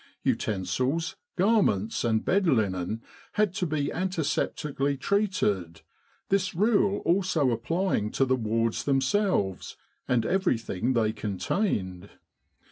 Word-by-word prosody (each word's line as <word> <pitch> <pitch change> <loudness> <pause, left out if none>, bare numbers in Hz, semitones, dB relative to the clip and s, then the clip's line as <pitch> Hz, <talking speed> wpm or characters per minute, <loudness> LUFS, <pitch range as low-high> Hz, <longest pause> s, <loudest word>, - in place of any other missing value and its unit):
Utensils, 125 - -1 0.2
garments, 185 - +2
and 110 -2 +1
bed 195 -1 +2
linen 110 - 0 0.3
had 210 -4 +1
to 185 -2 -1
be 150 -2 -1
antiseptically 150 -5 -1
treated, 105 - 0 0.5
this 190 -2 +1
rule 200 0 +2
also 170 -7 +2
applying 120 - 0
to 135 - +2
the 130 0 +2
wards 115 -1 -1
themselves 135 - 0 0.3
and 120 -3 +1
everything 125 - 0
they 110 -3 +1
con 105 -4 -4
tained. 95 - -1
135 Hz, 110 wpm, -27 LUFS, -, 0.5 s, garments